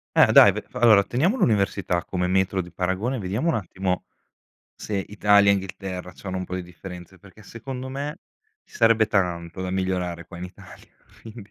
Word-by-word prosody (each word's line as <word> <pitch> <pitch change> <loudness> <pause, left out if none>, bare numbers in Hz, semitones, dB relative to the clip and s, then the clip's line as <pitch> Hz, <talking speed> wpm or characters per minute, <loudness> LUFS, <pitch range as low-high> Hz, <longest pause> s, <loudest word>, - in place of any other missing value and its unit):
Eh, - - +6
dai - - +8
ve - - -5
v - - -25
allora, 110 -4 +6
teniamo 165 - 0
l'università 100 - +1
come 90 -1 -2
metro 95 +1 +1
di 90 0 -11
paragone, 95 +9 -2
vediamo, 105 - -1
un - - +1
attimo, 95 -2 -3 0.7
se 105 - -5
Italia, 105 -1 +4
Inghilterra, 95 -1 -5
c'hanno 95 0 -5
un 95 - -4
po' 90 - -6
di 90 - -4
differenze, 90 +1 -11
perché, 100 +2 -17
secondo 125 +4 -7
me, 140 +3 -5 0.5
ci - - -23
sarebbe 115 -1 +4
tanto 90 -3 -1
da 95 - -3
migliorare, 90 -2 -2
qua 85 0 -11
in 90 - -6
Italia, 90 0 -13 0.3
quindi 110 -2 -11
95 Hz, 175 wpm, -24 LUFS, 90-110 Hz, 0.7 s, dai